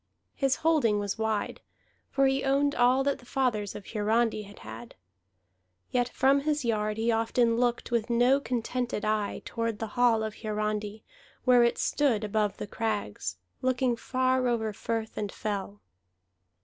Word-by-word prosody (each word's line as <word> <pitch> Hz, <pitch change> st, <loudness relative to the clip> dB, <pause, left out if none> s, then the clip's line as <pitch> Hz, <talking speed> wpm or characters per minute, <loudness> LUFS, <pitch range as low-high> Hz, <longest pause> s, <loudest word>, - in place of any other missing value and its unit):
His 270 Hz, -2 st, +1 dB
holding 285 Hz, -10 st, +3 dB
was 205 Hz, +1 st, -3 dB
wide, 220 Hz, -1 st, -1 dB, 0.5 s
for 275 Hz, -, +2 dB
he 270 Hz, 0 st, +2 dB
owned 280 Hz, +1 st, +2 dB
all 250 Hz, +2 st, +4 dB
that 280 Hz, 0 st, 0 dB
the -, -, -16 dB
fathers 230 Hz, -7 st, 0 dB
of 195 Hz, -, -8 dB
Hiarandi 220 Hz, +1 st, +1 dB
had 205 Hz, -, -14 dB
had. 115 Hz, +2 st, -9 dB, 1.0 s
Yet 245 Hz, 0 st, +1 dB
from 270 Hz, +3 st, +3 dB
his 295 Hz, -1 st, -1 dB
yard 215 Hz, -2 st, 0 dB
he 230 Hz, +1 st, +1 dB
often 230 Hz, +1 st, +2 dB
looked 240 Hz, 0 st, 0 dB
with 235 Hz, -1 st, 0 dB
no 245 Hz, +3 st, +4 dB
contented 245 Hz, -3 st, -2 dB
eye 215 Hz, -1 st, -1 dB
toward 230 Hz, -2 st, -2 dB
the 225 Hz, 0 st, -4 dB
hall 235 Hz, -3 st, +3 dB
of 220 Hz, -1 st, -5 dB
Hiarandi, 215 Hz, 0 st, -2 dB, 0.4 s
where 250 Hz, -2 st, +6 dB
it 235 Hz, -, +2 dB
stood 255 Hz, -8 st, +1 dB
above 210 Hz, -1 st, 0 dB
the -, -, -4 dB
crags, 205 Hz, -, -3 dB, 0.2 s
looking 255 Hz, -1 st, +1 dB
far 255 Hz, +1 st, +1 dB
over 220 Hz, -3 st, 0 dB
firth 225 Hz, +1 st, -3 dB
and 205 Hz, -2 st, -3 dB
fell. 205 Hz, -2 st, -4 dB
230 Hz, 155 wpm, -28 LUFS, 215-255 Hz, 1.0 s, where